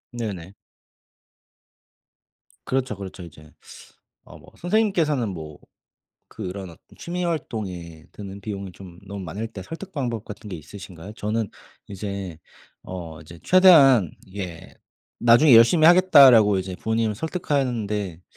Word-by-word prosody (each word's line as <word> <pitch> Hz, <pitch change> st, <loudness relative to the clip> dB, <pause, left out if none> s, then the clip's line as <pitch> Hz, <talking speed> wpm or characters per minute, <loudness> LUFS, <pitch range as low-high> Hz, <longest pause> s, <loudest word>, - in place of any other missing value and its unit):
네네. 100 Hz, -6 st, -6 dB, 2.1 s
그렇죠, 130 Hz, -4 st, -1 dB
그렇죠 95 Hz, -1 st, -9 dB
이제. 75 Hz, -2 st, -14 dB, 0.7 s
어 -, -, -14 dB
뭐 -, -, -17 dB
선생님께서는 175 Hz, -, +1 dB
뭐 80 Hz, -5 st, -8 dB, 0.7 s
그런 95 Hz, -2 st, -7 dB
어떤 85 Hz, -, -14 dB, 0.2 s
취미활동에 110 Hz, -, -5 dB
드는 100 Hz, -1 st, -9 dB
비용이 100 Hz, -2 st, -6 dB
좀 90 Hz, -2 st, -13 dB
너무 100 Hz, 0 st, -7 dB
많을 105 Hz, +7 st, -5 dB
때 100 Hz, -4 st, -10 dB
설득 175 Hz, -, -9 dB
방법 120 Hz, -, -3 dB
같은 105 Hz, 0 st, -10 dB
게 95 Hz, -, -5 dB
있으신가요? 90 Hz, +3 st, -11 dB
저는 110 Hz, 0 st, -3 dB, 0.4 s
이제 100 Hz, -4 st, -6 dB, 0.5 s
어 85 Hz, -4 st, -8 dB
이제 85 Hz, +2 st, -14 dB
최대한 140 Hz, -, +6 dB
이게 95 Hz, -4 st, -8 dB, 0.5 s
"나중에 120 Hz, +3 st, +6 dB
열심히 155 Hz, +8 st, +6 dB
하겠다."라고 135 Hz, -, +7 dB
이제 95 Hz, 0 st, -6 dB
부모님을 110 Hz, +1 st, -1 dB
설득하는데 115 Hz, -, -2 dB
105 Hz, 280 characters per minute, -23 LUFS, 95-130 Hz, 2.1 s, 하겠다."라고